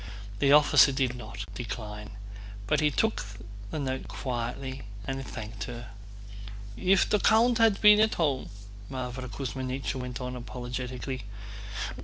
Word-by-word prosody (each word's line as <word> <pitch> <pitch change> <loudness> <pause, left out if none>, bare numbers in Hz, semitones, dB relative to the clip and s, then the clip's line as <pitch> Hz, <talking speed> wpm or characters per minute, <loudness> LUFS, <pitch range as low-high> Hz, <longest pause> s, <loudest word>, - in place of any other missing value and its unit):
The 140 - +4
officer 145 -1 +7
did 130 -2 0
not 100 -4 -7
decline, 105 -2 -6 0.6
but - - +2 0.2
took 220 - +2 0.5
the - - -4
note 130 -2 -2
quietly 130 +1 -4 0.2
and 135 0 -3
thanked 110 -3 -6
her. 120 -3 -8 0.8
"If 185 - +3
the 210 - +2
count 230 +3 +4
had 225 -3 +5
been 210 0 +8
at 220 0 +4
home..." 145 -6 0 0.4
Mávra 130 -1 -4
Kuzmínichna 130 +2 -3
went 125 -1 -5
on 125 0 -4
apologetically. 125 0 -5
130 Hz, 125 wpm, -29 LUFS, 120-140 Hz, 0.8 s, been